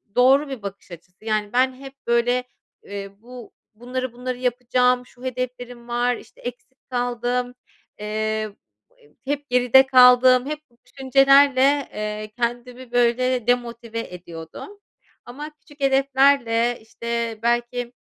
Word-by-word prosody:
doğru 270 +4 +4
bir 260 -5 -6
bakış 200 -1 -9
açısı. 180 +4 -14
Yani, 215 -1 -1
ben 260 +1 +3
hep, 270 +1 -11
böyle, 245 +1 +2 0.4
eee, 200 -1 -7
bu 245 0 -12 0.2
bunları, 250 +2 -5
bunları 250 +1 -5
yapacağım, 250 0 +1
şu 245 0 -19
hedeflerim 245 -1 -5
var, 245 +1 0
işte, - - -15
eksik 245 +2 -10
kaldım, 245 0 -2 0.5
eee, 215 0 -2 0.5
he 455 -3 -24 0.2
hep 290 -1 -4
geride 250 +1 +5
kaldım, 255 0 +6
hep 300 +1 -4
bu 235 - -31
düşüncelerle, 275 +1 +4
eee, 215 0 -5
kendimi, 245 +1 -4
böyle, 245 0 +1
demotive 235 -2 -1
ediyordum 175 - -9 0.5
ama 290 +5 -8
küçük 290 -2 -20
hedeflerle, 270 -3 +3
işte, 230 0 -4
belki 240 +1 -1
245 Hz, 125 wpm, -22 LUFS, 235-255 Hz, 0.5 s, kaldım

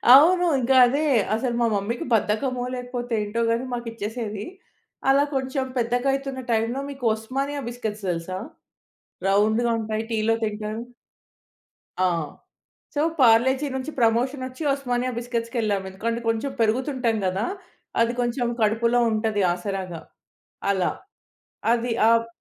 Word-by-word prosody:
అవును. 355 +6 +6
ఇంక 255 +1 0
అదే. 285 +5 +1 0.3
అసలు 240 +1 -1
మా 235 - +4
మమ్మీకి 210 +4 -2
బద్ధకమో, 245 +4 0
లేకపోతే 245 -1 -4
ఏంటో 210 +3 -2
గని 235 +3 0
మాకు 240 -1 -4
ఇచ్చేసేది. 215 -1 -4 0.7
అలా 280 +1 +5
కొంచెం 265 0 -1
పెద్దగా 245 +3 0
అయితున్న 275 -1 -3
టైమ్‌లో 225 +4 0
మీకు 270 -2 -11
ఒస్మానియా 275 +6 -3
బిస్కిట్స్ 220 -4 -5
తెల్సా? 175 +2 -3 0.9
రౌండ్‌గా 220 +4 +3
ఉంటాయి 220 0 -2
టీలో 220 +1 +2
తింటారు. 215 +1 -4 1.2
ఆ! 185 - +1 0.9
సో, 290 - 0 0.2
పార్లేజి 260 +4 +5
నుంచి 265 +3 -3
ప్రమోషనొచ్చి, 255 +4 0
ఒస్మానియా 250 -2 -1
బిస్కిట్స్‌కెళ్ళాం. 230 -4 -1
ఎందుకంటే, 230 +5 -2
కొంచెం 225 +5 0
పెరుగుతుంటం 245 +1 +1
గదా! 190 +3 0 0.6
అది 230 +1 +3
కొంచెం 240 +1 0
కడుపులో 230 +3 +3
ఉంటది 215 -2 0
ఆసరాగా. 180 -2 -4 0.7
అలా. 185 -3 +1 0.8
అది 240 0 0 0.2
ఆహ్, 230 0 +3
235 Hz, 120 wpm, -24 LUFS, 215-255 Hz, 1.2 s, అవును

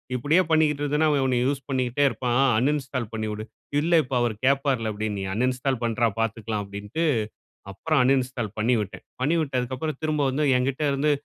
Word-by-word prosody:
"இப்படியே 145 +9 +3
பண்ணிக்ட்ருந்தனா, 150 -1 +2
அவன் 140 -2 +2
உன்னை 125 -2 +1
யூஸ் 140 0 -1
பண்ணிக்கிட்டே 130 +1 +1
இருப்பான். 120 +2 -1 0.2
அன்இன்ஸ்டால் 130 -4 -1
பண்ணிவிடு." 110 0 -4 0.4
"இல்லை 170 +1 +4
இப்ப 130 0 -4
அவரு 115 -3 0
கேப்பாருல்ல!" 135 -5 +1
அப்படின்னு 105 -1 -3
"நீ - - -3
அன்இன்ஸ்டால் 125 +1 0
பண்றா! 115 0 +1
பாத்துக்கலாம்" 110 -1 -2
அப்படின்ட்டு 100 +11 -4 0.7
அப்புறம் 155 +9 0
அன்இன்ஸ்டால் 125 -4 0
பண்ணிவிட்டேன். 110 -3 -1 0.2
பண்ணி 150 +6 +2
விட்டதுக்கு 130 -3 -2
அப்புறம், 155 -2 -3
திரும்ப 155 -1 0
வந்து 145 +3 0
என்கிட்ட 135 +3 -1
இருந்து 145 +2 +1
130 Hz, 155 wpm, -25 LUFS, 115-145 Hz, 0.7 s, இல்லை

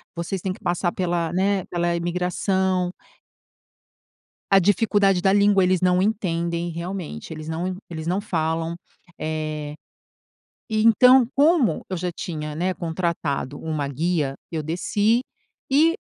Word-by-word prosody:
Vocês 170 +2 -3
têm 185 0 -2
que 210 - -14
passar 175 0 0
pela, 170 -3 -1
né, 190 0 +1
pela 175 0 0
imigração" 180 +1 0 1.6
a 195 - +7
dificuldade 200 -1 +3
da 190 0 +3
língua, 200 -1 +4
eles 185 -1 +2
não 180 0 +3
entendem 170 -4 -1
realmente, 170 - -6
eles 155 0 -8
não 165 +3 -2
en 185 - -3
eles 160 -2 -6
não 185 +3 0
falam. 165 -3 -1 0.4
Eh, 155 -1 -3 1.0
então 230 +4 +6
como 295 -3 +3
eu 185 - -1
já 180 +1 -2
tinha, 150 -3 -5
né, 180 +4 -1
contratado 160 -5 -2
uma 155 -3 -3
guia 150 -1 -1 0.2
eu 160 -2 -2
desci 205 +8 +1 0.5
e, 320 +5 +4
175 Hz, 130 wpm, -23 LUFS, 165-195 Hz, 1.6 s, a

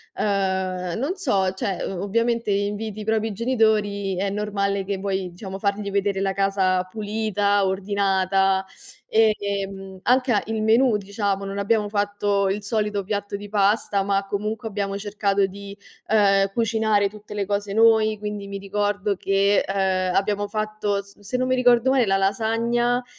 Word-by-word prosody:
uhm, 190 -3 -1
non 300 +8 -1
so, 195 - +1
cioè, 190 0 -3
o 185 -2 -4
ovviamente 230 +2 0
inviti 205 +1 -2
i - - -5
propri 220 0 0
genitori, 210 -4 +1
è 195 +2 -1
normale 200 -1 -1
che 195 -1 -3
vuoi, 190 -2 -2
diciamo, 190 +2 -8
fargli 200 0 -1
vedere 200 -1 0
la 195 0 +1
casa 195 -2 +1
pulita, 205 -1 0
ordinata, 195 0 +1 0.4
ehm, 200 -3 0
anche 255 0 +3
a 205 - +3
il 220 -1 -2
menù, 230 +2 +4
diciamo, 200 -1 -2
non 195 0 -5
abbiamo 210 +1 +1
fatto 205 -1 0
il 200 +2 -2
solito 210 -1 -1
piatto 205 0 -3
di 205 0 -7
pasta, 205 0 +2
ma 195 0 0
comunque 210 +3 -3
abbiamo 200 -1 -3
cercato 200 -1 0
di, 200 +1 -9 0.3
ehm, 195 -2 +3
cucinare 220 -3 +1
tutte 210 0 -11
le 205 -1 -2
cose 200 0 -2
noi, 220 -1 +4
quindi 210 -1 -5
mi 200 0 -5
ricordo 205 +1 -1
che, 195 +1 +2
eh, - - -2 0.4
abbiamo 205 +1 0
fatto, 215 -1 -2
s 200 +1 -20
se 205 +4 -6
non 255 0 0
mi 255 - +3
ricordo 245 0 +4
male, 260 -3 +3
la 195 0 +3
lasagna, 230 +5 +1
205 Hz, 160 wpm, -23 LUFS, 195-215 Hz, 0.4 s, menù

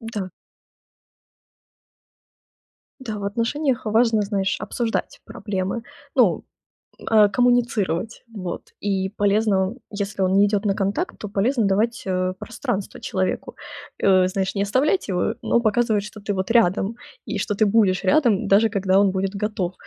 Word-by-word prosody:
Да. 220 -5 -5 2.7
Да, 220 -5 -5
в 200 - -6
отношениях 240 +6 -1
важно, 220 0 +3
знаешь, 200 -1 -1
обсуждать 230 -2 -3
проблемы. 195 +2 -4 0.3
Ну, - - +3 0.7
э, 215 -2 +6
коммуницировать, 230 -4 0
вот. 185 -5 -5 0.2
И 190 -2 -1
полезно, 205 0 +1 0.2
если 200 -1 -3
он 185 - +2
не 205 - +5
идёт 205 0 -1
на 200 - +2
контакт, 205 - -2
то 210 - -6
полезно 220 +4 +1
давать, 220 +4 +1
э, 185 0 0
пространство 195 0 -4
человеку. 185 0 -2 0.5
Э, 185 -2 +5
знаешь, 190 +1 -2
не 200 - 0
оставлять 270 - +1
его, 185 +4 0
но - - +2
показывать, 220 -1 +1
что 210 +1 -10
ты 205 +1 -2
вот 190 +1 -3
рядом, 215 -1 +2 0.4
и - - -1
что 205 - -1
ты 215 +2 +2
будешь 200 -3 +3
рядом, 225 -1 +3
даже 215 +3 +4
когда 195 -2 +1
он 200 -2 +3
будет 195 +1 -2
готов, 190 -4 -2
205 Hz, 140 wpm, -22 LUFS, 195-225 Hz, 2.7 s, э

